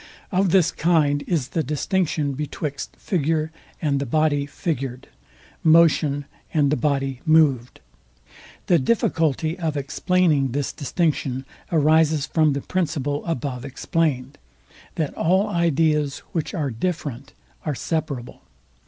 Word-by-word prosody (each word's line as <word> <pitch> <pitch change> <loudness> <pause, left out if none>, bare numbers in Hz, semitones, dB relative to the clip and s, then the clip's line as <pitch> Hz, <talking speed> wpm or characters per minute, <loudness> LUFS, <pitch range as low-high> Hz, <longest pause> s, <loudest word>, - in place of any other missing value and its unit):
Of 190 0 +2
this 180 -2 +4
kind 150 -3 +2
is 150 -8 0
the 160 - 0
distinction 150 +1 0
betwixt 145 0 -5
figure 160 -2 -1 0.3
and 140 -3 0
the 140 - -3
body 145 +1 +1
figured; 135 -4 -4 0.5
motion 155 -3 +4 0.3
and 145 -3 +2
the - - +3
body 135 -1 -1
moved. 150 -7 +3 0.8
The 175 - +4
difficulty 160 - +1
of 160 -3 -1
explaining 145 -2 +1
this 140 -1 -2
distinction 140 -3 -1 0.3
arises 155 -1 +3
from 155 -3 +2
the 140 - -2
principle 145 -5 -2
above 130 -5 -3
explained, 140 -1 -2 0.6
that 155 -3 -2
all 185 +5 +2
ideas, 155 -4 +1
which 165 +4 -3
are 145 -6 -1
different, 140 0 -4 0.3
are 150 -3 -2
separable. 140 -3 -4
150 Hz, 120 wpm, -23 LUFS, 140-165 Hz, 0.8 s, this